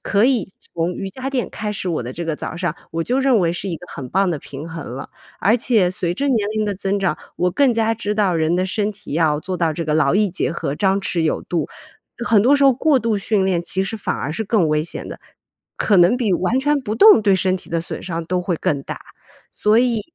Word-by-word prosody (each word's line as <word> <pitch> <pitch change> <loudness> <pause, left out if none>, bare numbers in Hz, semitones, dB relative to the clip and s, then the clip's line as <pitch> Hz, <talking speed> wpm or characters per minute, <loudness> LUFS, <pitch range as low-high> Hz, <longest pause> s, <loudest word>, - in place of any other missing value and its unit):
可 205 +2 +2
以 250 -8 +2 0.3
从 165 +1 0
瑜 195 0 -5
伽 260 +5 -5
垫 265 -3 -2
开 210 -1 -4
始 195 -2 -5
我 165 -7 -1
的 120 - -6
这 170 - -4
个 160 -2 -1
早 160 - -6
上， 170 -2 -2 0.2
我 165 0 -2
就 255 +2 0
认 265 -4 +3
为 170 -2 +1
是 185 +3 -4
一 170 - -3
个 180 - -13
很 130 -3 -6
棒 190 +4 +1
的 155 - -2
平 145 +3 -9
衡 160 -7 -7
了。 - - -8 0.3
而 220 +4 +3
且 225 -6 +2
随 175 -1 -2
着 280 +9 -2
年 220 -6 +1
龄 215 - +1
的 205 -1 -2
增 195 +1 -1
长， 190 -5 0 0.2
我 180 +1 +1
更 260 +4 +3
加 225 0 +2
知 210 -2 -3
道 200 -4 +2
人 160 +2 +1
的 185 - +1
身 205 +3 -1
体 200 -7 -10
要 155 -2 +2
做 185 +4 -5
到 165 -3 +1
这 165 - -3
个 150 - -1
劳 150 -1 +3
逸 205 -1 +2
结 175 - -1
合、 155 -4 -3
张 195 +3 +1
弛 180 -3 -1
有 160 - 0
度。 170 -5 -2 0.6
很 215 -3 +5
多 280 +4 +5
时 280 - +3
候 270 - +7
过 280 +2 +2
度 220 -2 0
训 200 -1 +1
练， 180 -3 +1
其 190 +2 -1
实 225 - -4
反 - - -2
而 150 - -3
是 220 - -2
更 200 -5 +2
危 150 0 +1
险 170 - -5
的， - - -9 0.6
可 200 -4 +3
能 175 +8 +5
比 225 -7 0
完 190 +8 +1
全 290 +2 +2
不 215 -4 -3
动， 420 - +7
对 200 -2 +3
身 185 0 +1
体 - - -12
的 165 -1 0
损 - - -6
伤 170 -2 -4
都 180 +2 -1
会 175 -1 -1
更 140 -3 -1
大。 - - -6 0.5
所 210 +2 +3
以 240 -2 +2
190 Hz, 280 characters per minute, -20 LUFS, 170-220 Hz, 0.6 s, 候